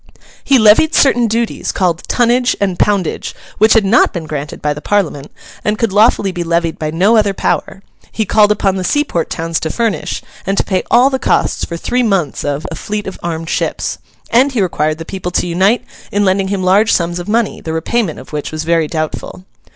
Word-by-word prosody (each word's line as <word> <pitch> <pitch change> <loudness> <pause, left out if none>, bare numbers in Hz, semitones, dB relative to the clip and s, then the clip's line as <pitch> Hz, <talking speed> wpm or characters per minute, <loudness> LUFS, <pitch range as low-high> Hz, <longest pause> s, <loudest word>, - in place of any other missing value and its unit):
He 275 - +4
levied 220 +8 +5
certain 245 -4 +4
duties 230 +1 -1
called 175 -3 0
tonnage 245 +1 +2
and 190 -3 -1
poundage 200 -5 0 0.2
which 220 +1 +5
had 225 -3 +4
not 215 +5 +4
been 170 -4 -5
granted 150 -1 -5
by 150 0 -1
the 150 - -9
Parliament, 160 -9 -1 0.3
and 210 0 0
could 225 -4 -1
lawfully 210 -2 +3
be 175 -2 -4
levied 170 -1 -1
by 155 - -2
no 190 +8 +3
other 205 -2 +2
power; 195 - -2 0.3
he 220 - -1
called 210 +1 +4
upon 195 -2 +1
the 185 - -3
seaport 180 - 0
towns 165 0 -2
to 160 - -3
furnish, 230 +3 -2 0.2
and 195 0 -2
to - - +2
pay 185 -2 -1
all 255 +3 +5
the 265 - -1
cost - - 0
for 170 - -5
three 250 +8 -1
months 195 - 0
of, 145 +1 -3
a - - -4
fleet 210 0 -4
of 190 - -7
armed 165 -1 -4
ships; - - -2 0.3
and 260 +4 +3
he 230 - +1
required 155 -3 -1
the 165 - -8
people 185 -1 -5
to - - +1
unite 190 +7 +1 0.3
in 205 0 +1
lending 190 0 +1
him 195 -1 -2
large 200 +4 +3
sums 170 0 0
of 175 +3 -7
money, 230 0 0
the 160 - -5
repayment 160 +3 -1
of - - -12
which 150 -1 -4
was 155 0 -4
very 165 -1 +1
doubtful. 155 +3 -5
195 Hz, 210 wpm, -15 LUFS, 165-220 Hz, 0.3 s, levied